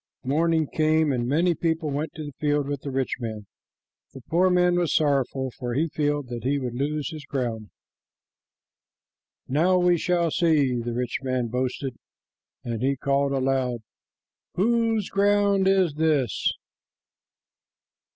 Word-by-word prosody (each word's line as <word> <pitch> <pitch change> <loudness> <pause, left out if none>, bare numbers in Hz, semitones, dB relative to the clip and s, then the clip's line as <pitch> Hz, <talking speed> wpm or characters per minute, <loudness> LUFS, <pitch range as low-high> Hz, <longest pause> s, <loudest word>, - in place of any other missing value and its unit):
Morning 160 +4 +1
came, 155 0 +2
and 120 -1 -1
many 170 +6 +2
people 160 -2 -1
went 150 +3 -2
to 155 - -6
the 145 - -7
field 145 -1 +1
with 145 -1 -3
the 140 - -5
rich 135 -1 -1
man. 110 -3 -5 0.7
The 135 - -9
poor 180 +3 +4
man 180 0 +3
was 175 -3 0
sorrowful, 135 -3 +1
for 120 -1 -5
he 160 +4 +1
feared 145 -2 -1
that 120 -1 -5
he 140 +3 +1
would 125 -3 -4
lose 145 +4 -2
his 155 -2 -8
ground. 115 -6 -3 1.8
"Now 170 +7 +3
we 180 -1 +3
shall 170 -2 +1
see," 150 -7 +2
said - - -9
the 120 - -2
rich 125 0 -2
man 130 -3 -1
boastfully, 130 +2 -2 0.7
and 115 -2 -4
he 135 +2 +1
called 140 +1 +1
aloud, 130 -3 0 0.7
"Whose 225 0 +1
ground 200 -1 +3
is 190 -5 +3
this?" 150 -7 +1
145 Hz, 145 wpm, -25 LUFS, 130-165 Hz, 1.8 s, poor